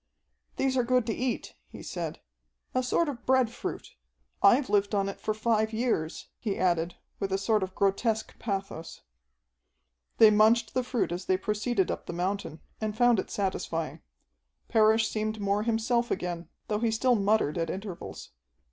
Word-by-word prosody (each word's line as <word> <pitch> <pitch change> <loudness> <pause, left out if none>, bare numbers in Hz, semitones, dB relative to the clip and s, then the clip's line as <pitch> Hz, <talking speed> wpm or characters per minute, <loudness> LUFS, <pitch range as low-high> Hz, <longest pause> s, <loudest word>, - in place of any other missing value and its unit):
"These 265 -1 +1
are 250 - +3
good 250 0 +2
to 225 - -1
eat," 250 0 -2 0.2
he - - -10
said. - - -5 0.5
"A 255 - +2
sort 285 +6 +1
of 250 -5 -5
bread 260 -3 +3
fruit. - - -6 0.5
I've 250 +7 +5
lived 205 0 +2
on 195 -1 +1
it 195 - -6
for - - -1
five 220 0 +1
years," 220 -9 -1
he 205 -4 -2
added 175 -2 +1 0.2
with 195 -1 -2
a 190 - +2
sort 215 +2 +1
of 190 0 -4
grotesque 215 +3 +1
pathos. 195 -6 -4 1.2
They 220 -1 +8
munched 220 +2 +4
the 255 - +1
fruit 245 -7 -1
as 175 +2 -4
they 185 - +2
proceeded 210 +1 0
up - - -5
the - - -4
mountain, 180 -3 -3 0.2
and 215 -1 -2
found 245 -3 +5
it - - -4
satisfying. 170 -5 -2 0.7
Parrish 220 0 +4
seemed 215 0 -2
more 200 0 +1
himself 235 +2 +1
again, 175 -2 -3 0.2
though 210 -1 0
he 230 0 +1
still 245 +3 +2
muttered 205 -7 +2
at 165 -1 -1
intervals. 190 -1 -7
215 Hz, 165 wpm, -28 LUFS, 195-235 Hz, 1.2 s, They